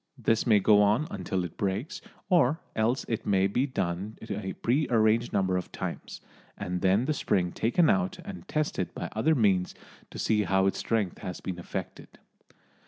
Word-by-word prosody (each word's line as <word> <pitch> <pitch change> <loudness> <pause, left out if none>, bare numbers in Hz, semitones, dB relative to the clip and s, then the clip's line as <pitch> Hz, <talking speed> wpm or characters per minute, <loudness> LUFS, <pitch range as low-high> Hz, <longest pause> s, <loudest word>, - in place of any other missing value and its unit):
This 115 0 +1
may 110 -3 +6
go 105 +1 +5
on 105 +8 +3
until 95 -1 -2
it 85 - -7
breaks, 100 - -2 0.3
or 160 -4 +3 0.2
else 115 +4 +1
it 115 - -2
may 95 -2 +2
be 125 +8 +1
done 95 -4 -3
a 100 -1 -3
prearranged 115 -3 +2
number 95 -2 +1
of 90 - -5
times, - - -6 0.4
and 90 -2 -3
then 95 +6 +3
the 155 - +1
spring 90 -10 0
taken 140 - +2
out 195 -3 +1
and 190 -2 -8
tested 155 -1 -2
by - - -4
other 155 +9 +2
means 95 -7 +2 0.3
to - - -10
see 110 -1 +2
how 95 +2 +2
its 95 - 0
strength 110 -6 -1
has 90 - -6
been 90 -2 -5
affected. 85 - -7
105 Hz, 170 wpm, -28 LUFS, 95-125 Hz, 0.4 s, may